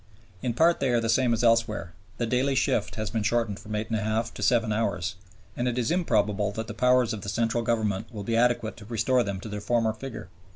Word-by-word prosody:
In 120 Hz, -3 st, -2 dB
part 165 Hz, +5 st, +4 dB
they 135 Hz, -, +1 dB
are 120 Hz, -1 st, +3 dB
the 115 Hz, -1 st, -2 dB
same 125 Hz, +1 st, +3 dB
as 115 Hz, +1 st, +1 dB
elsewhere; 115 Hz, -7 st, +2 dB, 0.2 s
the 120 Hz, -, 0 dB
daily 130 Hz, +4 st, +1 dB
shift 110 Hz, -5 st, 0 dB
has 110 Hz, -3 st, -3 dB
been 110 Hz, -, -1 dB
shortened 110 Hz, -1 st, 0 dB
from 105 Hz, 0 st, -6 dB
8 110 Hz, +2 st, -3 dB
1/2 110 Hz, +1 st, -1 dB
to -, -, -8 dB
7 115 Hz, -3 st, +2 dB
hours, 105 Hz, -5 st, -1 dB, 0.4 s
and 120 Hz, -, -1 dB
it 125 Hz, 0 st, -1 dB
is 120 Hz, +1 st, 0 dB
improbable 105 Hz, -, +1 dB
that 110 Hz, +2 st, -4 dB
the 110 Hz, -, -7 dB
powers 125 Hz, +1 st, +3 dB
of 105 Hz, -, -5 dB
the 100 Hz, -, -5 dB
Central 115 Hz, +2 st, 0 dB
Government 110 Hz, -2 st, -1 dB
will 105 Hz, -3 st, -6 dB
be 115 Hz, +3 st, -1 dB
adequate 115 Hz, -2 st, +1 dB
to 105 Hz, -, -11 dB
restore 120 Hz, +3 st, +1 dB
them 100 Hz, -4 st, -3 dB
to -, -, -7 dB
their 105 Hz, -1 st, -5 dB
former 115 Hz, +1 st, +1 dB
figure. 115 Hz, -6 st, -8 dB
115 Hz, 235 wpm, -27 LUFS, 105-120 Hz, 0.4 s, part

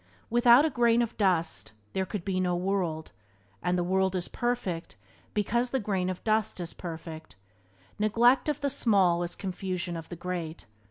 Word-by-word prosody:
Without 240 Hz, +4 st, +6 dB
a 315 Hz, -, +1 dB
grain 240 Hz, -1 st, +3 dB
of 235 Hz, -, -5 dB
dust 175 Hz, -, 0 dB, 0.2 s
there 190 Hz, -1 st, -1 dB
could 195 Hz, -2 st, -5 dB
be 190 Hz, -2 st, 0 dB
no 180 Hz, -1 st, +1 dB
world, 175 Hz, -4 st, -1 dB, 0.5 s
and 180 Hz, +1 st, +1 dB
the 175 Hz, -, +1 dB
world 190 Hz, +1 st, +1 dB
is 180 Hz, -1 st, -1 dB
perfect 200 Hz, -, -2 dB, 0.4 s
because 235 Hz, +4 st, +1 dB
the 265 Hz, -, 0 dB
grain 195 Hz, -4 st, -1 dB
of 185 Hz, -, -5 dB
dust 215 Hz, -3 st, +1 dB
is 170 Hz, -1 st, -4 dB
perfect. 160 Hz, -4 st, -8 dB, 0.6 s
Neglect 240 Hz, +6 st, +4 dB
of 295 Hz, -1 st, -2 dB
the 280 Hz, -1 st, 0 dB
small 195 Hz, -9 st, +3 dB
is 175 Hz, 0 st, -3 dB
confusion 185 Hz, -2 st, -3 dB
of 165 Hz, -1 st, -7 dB
the 175 Hz, -, -6 dB
great. 170 Hz, -2 st, -5 dB
190 Hz, 170 wpm, -28 LUFS, 175-230 Hz, 0.6 s, Without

